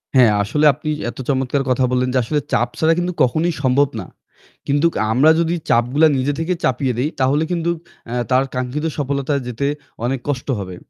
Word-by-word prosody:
হ্যাঁ, 120 -4 +6
আসলে 150 +9 0
আপনি 155 +3 -6 0.2
এত - - -9
চমৎকার 135 0 0
কথা 130 +1 +2
বললেন 125 0 +1
যে 130 - +2
আসলে 150 +5 0
চাপ 120 - +2
ছাড়া 160 +1 +4
কিন্তু 180 +1 -2
কখনোই 160 +7 +1
সম্ভব 130 +2 +3
না। - - -8 0.6
কিন্তু 145 +4 +3 0.3
আমরা 135 +7 +5
যদি 170 +1 +1
চাপগুলা 125 +7 +4
নিজে 135 +3 0
থেকে 165 +3 0
চাপিয়ে 130 0 +1
দেই 145 +5 +1
তাহলে 135 +4 +2
কিন্তু 170 -1 -1 0.4
এ্যা 120 - -3 0.2
তার 130 +1 +4
কাঙ্ক্ষিত 125 +5 -3
সফলতায় 140 0 -1
যেতে 125 +3 -3 0.4
অনেক 130 +2 -1
কষ্ট 130 -3 -2
হবে। 95 -2 -6
135 Hz, 180 wpm, -19 LUFS, 125-150 Hz, 0.6 s, হ্যাঁ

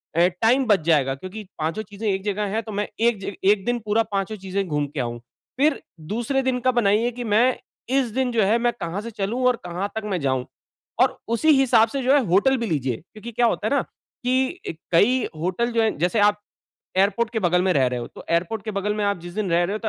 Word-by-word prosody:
अ, 170 - +2 0.2
time 250 +4 +4
बच 205 -4 +5
जाएगा। 145 -5 +3
क्योंकि 185 +9 -8 0.2
पाँचों 160 +7 -1
चीज़ें 210 +1 -6
1 190 0 -1
जगह 210 0 -1
हैं, 225 - +1
तो 220 - -8
मैं 205 +1 -2
एक 210 -4 0
1 200 -1 +4
दिन 240 0 0
पूरा 215 +2 +2
पाँचो 200 +2 -2
चीज़ें 195 +1 -3
घूम 150 -2 0
के 140 0 -7
आऊँ। 120 -1 -3 0.4
फ़िर 295 0 +2 0.3
दूसरे 240 +4 0
दिन 255 -1 0
का 255 +1 +2
बनाइए, 230 0 +2
कि 245 +1 -6
मैं 235 +4 +3 0.3
इस 265 -2 +2
दिन 260 0 0
जो 225 -3 +2
है, 215 +4 +3
मैं 240 0 +1
कहाँ 170 +4 -3
से 230 +1 -7
चलूँ 215 +5 -2
और 250 - +4
कहाँ 180 +3 -3
तक 220 - -3
मैं 180 - 0
जाऊँ। 130 -2 0 0.6
और - - +3
उसी 235 +8 +1
हिसाब 235 -4 +5
से 275 +3 -3
जो 260 +2 +4
है, 290 - +6
होटल 205 +9 +3
भी 235 - -2
लीजिए। 135 - -1
क्योंकि 215 +7 -11
क्या 235 +1 +2
होता 215 -2 0
है 280 +4 +2
न, - - +1
कि 260 +7 -3 0.3
कई 240 +8 +4 0.2
होटल 185 +8 -1
जो 230 - +2
है 220 - +3
जैसे 180 +7 +1
आप 205 0 +4 0.6
एयरपोर्ट 205 +4 +2
के 225 - -1
बगल 180 -2 +2
में 185 - +2
रह 130 -3 +3
रहे 125 -1 -2
हो, 120 - -5
तो - - -13
एयरपोर्ट 175 +5 0
के 215 - -3
बगल 200 +1 -1
में 210 - -1
आप 200 -3 0
जिस 175 +1 -9
दिन 210 -3 -2
रह 170 +1 +3
रहे 190 +4 -1
हो, 215 - -3
210 Hz, 240 wpm, -23 LUFS, 180-235 Hz, 0.6 s, है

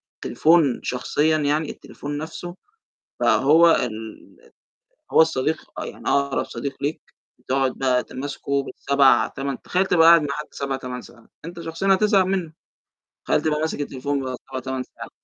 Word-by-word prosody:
التليفون 160 -5 +2
شخصيًا 150 +5 +1
يعني 150 +1 0
التليفون 145 0 -7
نفسه، 165 +3 -7 0.6
بقى - - +3
هو 165 +4 +6
ال 120 - -4 0.6
هو - - +5
الصديق 160 0 0 0.3
يعني - - -7
أقرب 140 -1 +1
صديق 135 +4 -6
ليك 145 +3 -2 0.4
بتقعد 130 +1 0
بقى 130 -2 +2
ت - - -16
ماسكه 140 +1 -2
بال7، 135 -4 +3
8 135 -1 -5
تخيّل 185 +2 0
تبقي 165 -3 +4
قاعد 170 0 +8
مع 150 - -3
حد 150 +2 -5
7، 135 -1 -3
8 125 -1 -6
ساعات؟ 115 -1 -17 0.2
أنت 170 +1 -8
شخصيًا 165 +4 +1
هتزهق 200 -1 +3
منّه. 185 -4 -2 0.7
تخيّل - - +1
تبقي 150 -1 0
ماسك 160 -1 -2
التليفون 140 0 -2
بقى 130 -1 -4
7، 130 - -4
8 130 0 -4
ساعات؟ - - -11
145 Hz, 160 wpm, -23 LUFS, 130-165 Hz, 0.7 s, قاعد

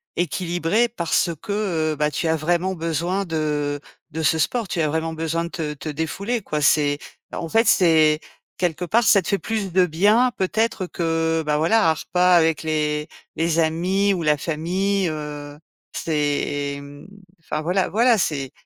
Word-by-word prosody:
équilibrée 175 +6 0
parce 170 -4 0
que, 190 -7 -1
heu, - - -5
bah, 150 0 0
tu 160 - -2
as 160 - +2
vraiment 175 +4 0
besoin 170 +4 -2
de 150 -3 -2 0.3
de 160 +2 -4
ce 160 +1 +2
sport. 230 +7 0
Tu 175 - -3
as 155 - +2
vraiment 160 +1 -2
besoin 165 +1 -2
de - - -6
te 160 -5 -4
te 150 +2 -7
défouler, 190 +10 -3
quoi 150 -5 -3
c'est 145 0 +3 0.3
en 165 - -4
fait 225 +7 +3
c'est 160 -6 +4 0.4
quelque 175 -1 -1
part 230 +7 +2
ça 205 -2 +5
te - - -8
fait 200 - +1
plus 215 -4 -3
de 185 +1 +4
bien 210 +10 +3
peut-être 210 +1 0
que, 165 -2 -1
heu, - - -6
bah, 150 -1 0
voilà 170 +5 +3
un - - +4
repas 180 +3 +2
avec 165 -2 +3
les 150 -1 -1 0.3
les 165 0 0
amis 180 +5 +1
ou 180 - -2
la 150 -2 +2
famille, 180 +6 -1
heu. 150 -1 -6 0.4
C'est, 145 -2 -1
mmh, 145 +3 -12 0.3
enfin, 155 -1 -4
voilà 180 +3 0
voilà 230 +1 +3
c'est 140 -6 -1
165 Hz, 175 wpm, -22 LUFS, 155-190 Hz, 0.4 s, ça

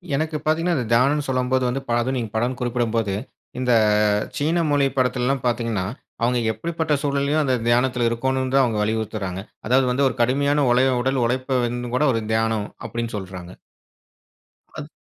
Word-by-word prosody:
எனக்கு 155 +1 -1
பாத்தீங்கன்னா, 165 +3 +1
அந்த 120 -3 -2
தியானம்னு 140 +4 +2
சொல்லும்போது 130 0 +1
வந்து, 135 +2 -2
பலதும் 120 +3 +1
நீங்க 115 -4 -4
பலன் 125 +2 -1
குறிப்பிடும் 120 -2 -1
போது, 110 -4 0 0.5
இந்த 125 -1 +1 0.7
சீன 165 +4 +1
மொழி 145 -1 +3
படத்துல்லாம் 125 +1 0
பாத்தீங்கன்னா, 115 -5 -1 0.4
அவுங்க 120 +1 +2
எப்படிப்பட்ட 165 +2 -3
சூழ்நிலைலயும் 140 +2 +1
அந்த 130 -2 +1
தியானத்தில 125 0 +2
இருக்கோணும் 130 +2 -1
தான் 135 - +6
அவுங்க 110 -4 -1
வலியுறுத்துறாங்க. 105 -3 -2 0.3
அதாவது 130 +1 +4
வந்து, 135 +2 +2
ஒரு - - -6
கடுமையான 140 +4 +2
ஒலய 130 +1 +3
உடல் 130 -1 0
உழைப்ப 130 +1 0
வந்து 120 0 -4
கூட 150 - +2
ஒரு 115 - 0
தியானம் 110 -1 0 0.2
அப்படின்னு 115 +1 -4
சொல்றாங்க. 95 -2 -8 1.2
அத் 150 - -6
125 Hz, 155 wpm, -22 LUFS, 115-135 Hz, 1.2 s, தான்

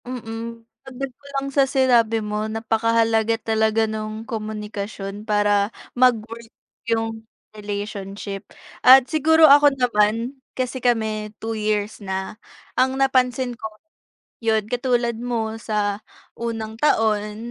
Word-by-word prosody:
Mm. 230 -1 -7 0.2
Dagdag 265 0 -7
ko 280 - -28
lang 275 0 -2
sa 275 -1 +3
sinabi 235 -5 +3
mo, 210 +1 -2
napakahalaga 225 0 +1
talaga 220 0 +1
nung 215 0 -5
komunikasyon 210 -2 -6
para 205 -1 +2 0.2
mag-work 230 -2 +1 0.4
yung 225 -1 -1 0.3
relationship. 200 -1 -6 0.3
At 260 0 +8
siguro 320 +2 +4
ako 290 0 +8
naman, 235 +2 +1 0.2
kasi 255 0 -2
kami 220 -3 0
two 225 0 -4
years 215 0 -2
na, 190 -1 -4 0.4
ang 260 +1 +1
napansin 255 -2 +1
ko 220 -2 -8 0.7
yun 220 -2 +2
katulad 240 -1 0
mo 230 -3 -2
sa 210 -1 -1 0.4
unang 225 -2 -4
taon 215 -6 +2
225 Hz, 115 wpm, -22 LUFS, 215-245 Hz, 0.7 s, At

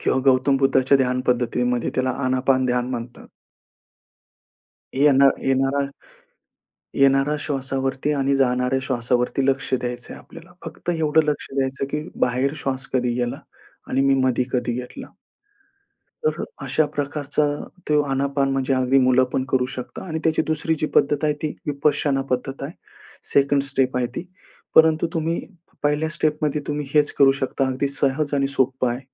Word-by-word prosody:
किंवा 130 - +1
गौतम 130 +2 +2
बुद्धाच्या 135 0 +3
ध्यान 125 -1 +1
पद्धतीमध्ये 125 0 0
त्याला, 130 0 +1
आनापान 130 0 +2
ध्यान 125 0 0
म्हणतात. 120 -1 -6 1.7
येणा 140 0 +5
येणारा 135 +1 +1 1.1
येणारा 135 +1 +3
श्वासावरती 135 0 -2
आणि 140 -1 +1
जाणाऱ्या 125 -1 +1
श्वासावरती 125 0 0
लक्ष 135 0 0
द्यायचंय 120 -1 -4
आपल्याला. - - -14
फक्त - - -5
एवढं 160 -2 +2
लक्ष 150 -1 -2
द्यायचं 135 0 -1
की 150 - -1 0.2
बाहेर 130 +3 +1
श्वास 135 -2 -3
कधी 125 -2 +1
गेला 120 0 -2 0.5
आणि 130 - +1
मी 135 0 +4
मध्ये 125 -1 +2
कधी 125 -1 0
घेतला. 125 +1 -6 1.2
तर - - 0 0.2
अशा 155 -1 +1
प्रकारचा 145 +1 -1 0.4
तो 150 -1 +4
आनापान 140 0 0
म्हणजे 135 0 0
अगदी 130 +1 +3
मुलं 130 0 +4
पण 130 - 0
करू 130 -1 +2
शकता 125 - -7
आणि 160 -2 -3
त्याची 160 -1 +2
दुसरी 160 +1 0
जी 155 - 0
पद्धत 145 +2 +3
आहे 150 - +3
ती 155 - -2
विपश्यना 145 -1 +1
पद्धत 135 +2 -2
आहे. 140 - -5 0.6
सेकंड 140 0 +3
स्टेप 135 -2 0
आहे 125 -1 +1
ती. - - -3 0.5
परंतु 160 +1 +5
तुम्ही 165 +1 -1 0.4
पहिल्या 150 +2 +1
स्टेपमध्ये 150 -1 0
तुम्ही 145 -1 -3
हेच 150 -1 +3
करू 135 -1 +6
शकता, 135 0 -1
अगदी 130 +2 -1
सहज 140 +1 0
आणि 140 -1 +1
सोपं 130 -2 0
आहे. 120 +2 -4
135 Hz, 145 wpm, -22 LUFS, 130-145 Hz, 1.7 s, करू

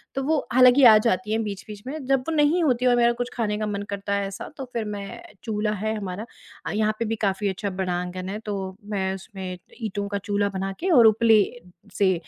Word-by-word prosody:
तो 270 - -1
वो 310 +2 +2 0.2
हालाँकि 255 +2 +6
आ 220 -3 +10
जाती 210 -2 0
हैं 225 0 +1
बीच-बीच 205 0 -7
में, 300 +4 -4
जब 270 0 +3
वो - - -1
नहीं 300 +4 +3
होती 255 -4 +2
और 245 - +5
मेरा 235 0 +4
कुछ 245 - -2
खाने 210 -3 -1
का 215 - -2
मन 205 -1 -3
करता 200 0 -3
है 200 0 -1
ऐसा, 195 0 -7
तो 270 - -5
फिर 230 -2 -2
मैं 200 -1 -6 0.2
चूल्हा 215 -2 -1
है 220 0 0
हमारा 200 +1 -5 0.4
अ, - - -2
यहाँ 215 0 +1
पे 230 - 0
भी 225 - -1
काफ़ी 200 0 0
अच्छा 200 +2 -3
बड़ा 180 -2 0
आँगन 180 +1 -4
है, 210 - -4
तो 195 -3 -5
मैं 190 -2 -1
उसमें 190 -1 -7 0.3
ईंटो 205 -2 -3
का 200 0 -2
चूल्हा 205 -1 +1
बना 195 +1 -2
के 375 - -1
और 230 - +8
उपले 220 0 +5 0.6
से 190 -2 +4
210 Hz, 230 wpm, -24 LUFS, 195-230 Hz, 0.6 s, आ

